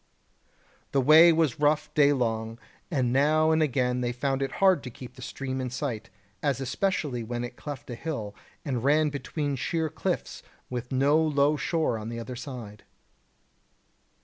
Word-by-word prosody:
The 140 Hz, -, +3 dB
way 155 Hz, +6 st, +8 dB
was 160 Hz, -6 st, +1 dB
rough 150 Hz, +1 st, +1 dB
day 145 Hz, -1 st, +5 dB
long, 115 Hz, -4 st, -1 dB, 0.3 s
and 130 Hz, -7 st, 0 dB
now 155 Hz, +3 st, +3 dB
and 160 Hz, 0 st, +3 dB
again 125 Hz, -4 st, +1 dB
they 120 Hz, -1 st, 0 dB
found 135 Hz, +2 st, -1 dB
it 135 Hz, -1 st, -2 dB
hard 190 Hz, -5 st, +4 dB
to 125 Hz, -, -7 dB
keep 125 Hz, +1 st, -11 dB
the 130 Hz, -, -13 dB
stream 130 Hz, +1 st, -4 dB
in 130 Hz, -, -3 dB
sight, 120 Hz, -4 st, -4 dB, 0.3 s
as 140 Hz, -4 st, 0 dB
especially 140 Hz, -3 st, -1 dB
when 120 Hz, +2 st, -4 dB
it 120 Hz, 0 st, -6 dB
cleft 145 Hz, +1 st, -7 dB
a 125 Hz, -, -6 dB
hill, 115 Hz, -6 st, -5 dB, 0.3 s
and 125 Hz, -5 st, -2 dB
ran 150 Hz, +2 st, +3 dB
between 145 Hz, +1 st, -3 dB
sheer 160 Hz, +4 st, -1 dB
cliffs 175 Hz, +4 st, -3 dB, 0.3 s
with 125 Hz, 0 st, -4 dB
no 140 Hz, +4 st, +3 dB
low 150 Hz, -1 st, +2 dB
shore 155 Hz, -6 st, 0 dB
on 110 Hz, +2 st, -6 dB
either 115 Hz, +2 st, -6 dB
side. 120 Hz, -5 st, -8 dB
135 Hz, 165 wpm, -27 LUFS, 125-150 Hz, 0.3 s, way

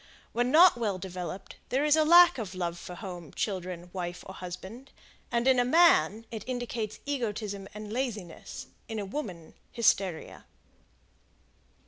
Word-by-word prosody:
When 240 Hz, +1 st, 0 dB
not 330 Hz, +2 st, +7 dB
well 210 Hz, -5 st, -1 dB
developed 185 Hz, 0 st, -7 dB
there 270 Hz, +4 st, +1 dB
is 300 Hz, 0 st, +5 dB
a 315 Hz, -, +4 dB
lack 345 Hz, -2 st, +7 dB
of 195 Hz, -4 st, -5 dB
love 175 Hz, -1 st, -3 dB
for 180 Hz, -, -8 dB
home, 175 Hz, -7 st, -8 dB
children, 180 Hz, -3 st, -4 dB
wife 175 Hz, -1 st, -5 dB
or 190 Hz, -, -8 dB
husband; 190 Hz, +9 st, -8 dB, 0.4 s
and 235 Hz, +1 st, +1 dB
in 260 Hz, -1 st, +5 dB
a -, -, +4 dB
man, 240 Hz, -, +4 dB
it 220 Hz, -3 st, -5 dB
indicates 245 Hz, -4 st, -4 dB
egotism 210 Hz, -7 st, -3 dB
and 210 Hz, 0 st, -7 dB
laziness, 220 Hz, -10 st, -5 dB, 0.2 s
in 225 Hz, -, -5 dB
a 205 Hz, -, -3 dB
woman, 190 Hz, -, -6 dB, 0.2 s
hysteria. 195 Hz, -7 st, 0 dB
210 Hz, 145 wpm, -29 LUFS, 185-245 Hz, 0.4 s, not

